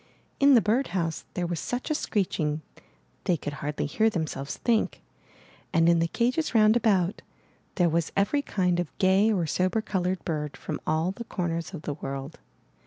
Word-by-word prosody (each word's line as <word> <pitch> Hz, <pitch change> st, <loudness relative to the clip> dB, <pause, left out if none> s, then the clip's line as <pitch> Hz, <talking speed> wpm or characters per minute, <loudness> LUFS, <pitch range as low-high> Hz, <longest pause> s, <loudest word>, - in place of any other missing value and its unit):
In 280 Hz, -1 st, +7 dB
the 235 Hz, -, +6 dB
birdhouse 190 Hz, -, 0 dB
there 180 Hz, -, -1 dB
was 170 Hz, -2 st, -2 dB
such 250 Hz, +5 st, -3 dB
a -, -, +4 dB
screeching 160 Hz, -, -1 dB, 0.6 s
they 175 Hz, -, +2 dB
could 145 Hz, -, -5 dB
hardly 150 Hz, +1 st, -2 dB
hear 220 Hz, +9 st, +2 dB
themselves 160 Hz, -7 st, -3 dB
think, 230 Hz, -2 st, 0 dB, 0.7 s
and 165 Hz, 0 st, +4 dB
in 170 Hz, 0 st, +5 dB
the 165 Hz, -, +2 dB
cages 250 Hz, -, 0 dB
round 215 Hz, 0 st, +6 dB
about, 200 Hz, -5 st, +2 dB, 0.5 s
there 175 Hz, -3 st, +3 dB
was 165 Hz, 0 st, 0 dB
every 205 Hz, +9 st, +2 dB
kind 180 Hz, -9 st, 0 dB
of 175 Hz, -4 st, -4 dB
gay 195 Hz, +3 st, +4 dB
or 180 Hz, -6 st, +1 dB
sober 185 Hz, +7 st, +1 dB
colored 185 Hz, -3 st, -2 dB
bird 150 Hz, -3 st, -3 dB
from 155 Hz, -, -5 dB
all 160 Hz, +3 st, +1 dB
the 235 Hz, -, -7 dB
corners 170 Hz, -3 st, -3 dB
of 155 Hz, -, -8 dB
the 145 Hz, -, -2 dB
world. 140 Hz, +1 st, -6 dB
180 Hz, 175 wpm, -27 LUFS, 160-215 Hz, 0.7 s, In